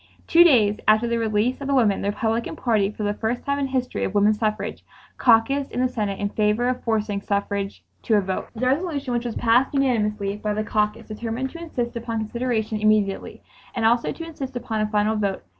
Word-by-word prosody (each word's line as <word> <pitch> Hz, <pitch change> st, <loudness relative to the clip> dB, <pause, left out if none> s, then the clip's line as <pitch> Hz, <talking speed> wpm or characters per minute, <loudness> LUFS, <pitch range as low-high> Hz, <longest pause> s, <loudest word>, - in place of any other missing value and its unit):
Two 340 Hz, +1 st, +7 dB
days 220 Hz, -11 st, +4 dB
after 215 Hz, +2 st, +4 dB
the 235 Hz, 0 st, 0 dB
release 225 Hz, +4 st, 0 dB
of 275 Hz, -, -4 dB
the 280 Hz, -, +1 dB
women, 220 Hz, -6 st, +3 dB
the 200 Hz, -, 0 dB
Republican 225 Hz, +6 st, -1 dB
Party, 220 Hz, -8 st, +1 dB
for 210 Hz, 0 st, -6 dB
the 205 Hz, 0 st, 0 dB
first 225 Hz, +3 st, -3 dB
time 280 Hz, 0 st, 0 dB
in 280 Hz, -, 0 dB
the 265 Hz, -, -6 dB
history 255 Hz, -1 st, -1 dB
of 190 Hz, -, -3 dB
woman 205 Hz, +1 st, +4 dB
suffrage, 215 Hz, 0 st, -2 dB, 0.4 s
caucused 265 Hz, +4 st, +3 dB
in -, -, -3 dB
the 255 Hz, -, +3 dB
Senate 210 Hz, -6 st, -3 dB
in 205 Hz, -, -1 dB
favor 215 Hz, +3 st, +1 dB
of 250 Hz, 0 st, -2 dB
forcing 215 Hz, -3 st, -1 dB
suffrage 200 Hz, 0 st, -2 dB, 0.2 s
to 220 Hz, -, +1 dB
a 205 Hz, -, +4 dB
vote. 190 Hz, -1 st, -3 dB
The 240 Hz, +3 st, -2 dB
resolution 280 Hz, -1 st, 0 dB
which 240 Hz, 0 st, -1 dB
was 235 Hz, -, -3 dB
passed 245 Hz, +4 st, +2 dB
unanimously 210 Hz, -6 st, 0 dB
by 210 Hz, 0 st, -2 dB
the 215 Hz, -, -1 dB
caucus 210 Hz, -1 st, -1 dB
determined 230 Hz, +4 st, -4 dB
to 335 Hz, -, -9 dB
"insist 245 Hz, -8 st, -4 dB
upon 230 Hz, 0 st, -3 dB
consideration 220 Hz, -1 st, -2 dB
immediately" 210 Hz, -2 st, +1 dB, 0.3 s
and 230 Hz, -2 st, 0 dB
'also 235 Hz, +1 st, +3 dB
to 330 Hz, -, -7 dB
insist 275 Hz, -5 st, -7 dB
upon 230 Hz, -3 st, -2 dB
a 215 Hz, -, +1 dB
final 210 Hz, +1 st, +1 dB
vote 200 Hz, -2 st, -2 dB
225 Hz, 215 wpm, -23 LUFS, 210-250 Hz, 0.4 s, Two